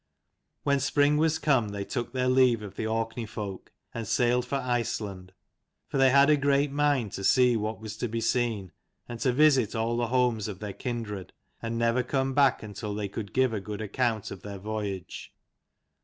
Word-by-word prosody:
When 140 -1 +2
spring 145 +2 +3
was 160 0 +2
come 130 -8 +2
they 100 -1 -4
took 120 +1 -3
their 130 0 0
leave 125 -3 +4
of 100 - -8
the 110 - -2
Orkney 115 +1 -2
folk, 100 -3 -7 0.2
and 115 -2 -5
sailed 120 +2 +2
for 140 - -2
Iceland: 115 -7 -2 0.6
for 135 - -1
they 135 0 +6
had 140 +2 +6
a 150 - +5
great 140 0 +2
mind 145 -7 +1
to 95 - -6
see 125 +3 +4
what 110 0 -2
was 110 -1 -7
to 120 - -2
be 115 +1 -3
seen, 115 -5 0 0.4
and 120 -1 -7
to 130 - +2
visit 135 -5 +4
all 115 +1 0
the 120 0 0
homes 120 -4 +1
of 100 -3 -6
their 105 0 -6
kindred, 110 -7 -5 0.3
and 115 0 -3
never 115 +2 +2
come 135 +1 -1
back 140 -3 +3
until 105 0 -5
they 105 -1 -3
could 100 0 -6
give 130 -2 +2
a 105 - -1
good 105 +1 -6
account 110 0 -1
of 95 - -8
their 100 0 -7
voyage. 100 -2 -5
115 Hz, 195 wpm, -28 LUFS, 105-130 Hz, 0.6 s, they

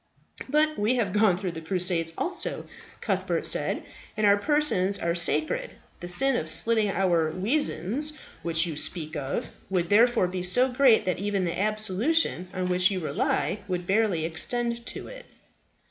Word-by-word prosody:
"But 305 0 +1
we 215 +5 +1
have 215 -7 -1
gone 205 -4 +3
through 185 -1 -4
the 165 -1 -8
Crusades 175 -1 +1
also," 365 +1 -3 0.4
Cuthbert - - -2
said, - - -1 0.3
"and 215 - +1
our 200 0 +6
persons 205 -6 +1
are 170 -3 -1
sacred. 315 - 0 0.3
The 175 - -7
sin 270 +9 +2
of 155 - -2
slitting 220 +4 +4
our 175 -5 +1
weazands, 245 - +1 0.3
which 165 -1 +2
you 165 -3 -5
speak 160 +1 -1
of, 140 -2 -4 0.2
would 180 -3 -1
therefore 230 -1 +4
be 180 0 -5
so 215 +9 +3
great 250 -2 +4
that 180 -1 -1
even 200 -1 -1
the 170 +2 -2
absolution 215 - 0
on 185 -1 -3
which 180 0 +3
you 195 -2 -3
rely 160 +1 -1
would 180 -2 -3
barely 195 -4 +1
extend 235 +8 -1
to - - -7
it." - - -12
195 Hz, 160 wpm, -26 LUFS, 175-240 Hz, 0.4 s, our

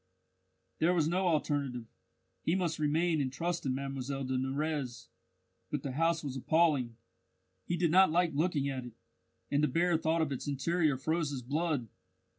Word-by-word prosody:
there 175 +3 +3
was 160 -3 +2
no 185 +3 +1
alternative, 145 -6 0 0.6
he 165 - +1
must 170 -4 -1
remain 155 +1 +2
and 130 -2 -1
trust 170 +1 -2
in 130 - 0
Mlle 135 0 -3
de 130 0 -2
Nurrez. 135 -1 -2 0.6
But - - -3
the 140 - -3
house 165 +4 +1
was 135 -3 -4
appalling; 140 -4 +2 0.7
he 175 - -1
did 170 -2 +2
not 190 +2 +6
like 170 +1 +2
looking 150 -2 +1
at 135 -2 -3
it, 120 -2 -9 0.6
and 145 +1 +2
the - - +5
bare 170 +1 +2
thought 160 +1 +1
of 150 - -2
its 135 - -4
interior 150 +1 +1
froze 160 +3 0
his 135 -3 -5
blood. 145 -1 -1
150 Hz, 170 wpm, -32 LUFS, 135-165 Hz, 0.7 s, not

